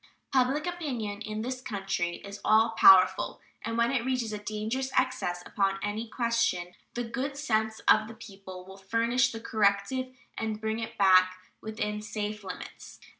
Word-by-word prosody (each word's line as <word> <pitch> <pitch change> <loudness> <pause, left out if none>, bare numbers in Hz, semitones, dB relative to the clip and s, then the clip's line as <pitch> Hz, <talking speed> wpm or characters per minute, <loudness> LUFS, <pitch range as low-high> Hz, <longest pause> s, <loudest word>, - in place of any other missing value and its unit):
Public 270 +4 +2
opinion 250 -13 -4
in 215 0 -4
this 255 +1 -4
country 195 -6 -2
is 200 0 -9
all 220 +1 +5
powerful, 190 -3 +6 0.2
and 230 +1 -3
when 235 +1 +3
it 255 -4 0
reaches 250 -4 -1
a 210 - -4
dangerous 220 +5 -3
excess 255 -9 0
upon 195 -1 0
any 210 +3 -3
question 230 -8 0 0.2
the 240 - -1
good 265 +4 -4
sense 220 -6 0
of 215 - +5
the 225 - -10
people 195 -4 -11
will 190 +1 -12
furnish 230 +5 +1
the 225 - -6
corrective 220 +4 0 0.2
and 220 -1 -3
bring 220 +1 -2
it 225 - -6
back 185 -1 +5 0.3
within 210 -1 -3
safe 210 -1 -4
limits. 185 -2 -9
220 Hz, 160 wpm, -29 LUFS, 200-235 Hz, 0.3 s, powerful